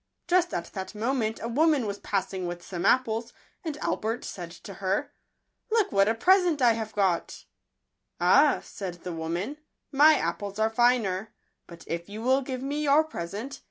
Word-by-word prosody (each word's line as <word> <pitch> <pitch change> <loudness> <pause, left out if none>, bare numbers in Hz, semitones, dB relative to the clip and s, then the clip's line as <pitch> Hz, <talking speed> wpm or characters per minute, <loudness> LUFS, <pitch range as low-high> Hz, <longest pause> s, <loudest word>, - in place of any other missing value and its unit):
Just 355 0 +3
at 170 - -2
that 190 +1 -6
moment 225 0 -1
a - - -2
woman 290 +1 +2
was 200 -1 -4
passing 190 -2 -2
with 175 0 -6
some 180 +1 -2
apples; 230 -2 +1 0.3
and 310 -4 -4
Albert 225 +3 -2
said 175 -3 -6
to 180 +3 -11
her, 200 +10 -1 0.3
" - - -52
Look 445 -3 +2
what 195 0 +4
a 225 - +2
present 355 +3 +4
I 245 -3 +5
have 220 -1 -5
got." 190 -4 0 0.4
" - - -53
Ah," - - +5
said 180 -4 -7
the 180 - -4
woman, 170 - -3 0.2
" - - -56
my 300 +2 +7
apples 200 -6 -3
are 220 +1 +1
finer; 225 -4 +2 0.4
but 170 - -12
if 170 +2 -5
you 215 +2 -7
will 260 +2 +3
give 255 -1 -5
me 290 +2 -2
your 295 +1 +4
present 235 - -6
220 Hz, 185 wpm, -27 LUFS, 190-275 Hz, 0.4 s, my